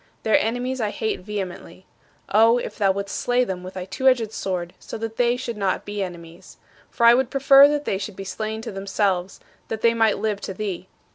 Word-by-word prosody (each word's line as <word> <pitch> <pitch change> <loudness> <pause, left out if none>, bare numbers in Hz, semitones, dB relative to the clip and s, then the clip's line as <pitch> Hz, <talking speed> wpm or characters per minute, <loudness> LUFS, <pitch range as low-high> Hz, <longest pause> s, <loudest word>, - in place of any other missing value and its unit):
Their 220 - +4
enemies 245 +3 -2
I 215 - 0
hate 220 +1 -2
vehemently. 185 -2 -7 0.4
Oh, 225 +3 +5
if - - -5
thou 200 -3 +2
wouldst 200 +1 -4
slay 245 +1 +1
them 190 -6 -4
with 185 +1 -9
thy 185 -1 -5
two 190 +8 -2
edged 235 -5 +3
sword, 180 -4 -4
so - - -7
that 225 0 -6
they 245 0 +2
should 235 -3 -5
not 195 -2 -1
be 205 0 -4
enemies! 170 -2 -8 0.3
For 235 - 0
I 235 - +9
would 255 0 +2
prefer 275 +1 +7
that 295 0 -1
they 190 - -1
should 195 0 -6
be 195 - -7
slain 215 +3 -4
to - - -5
themselves, 195 -1 -1 0.3
that 220 -1 -5
they 230 0 +4
might 225 -2 +2
live 210 -1 -2
to 190 - -6
thee. 190 -3 -4
210 Hz, 215 wpm, -23 LUFS, 190-235 Hz, 0.4 s, I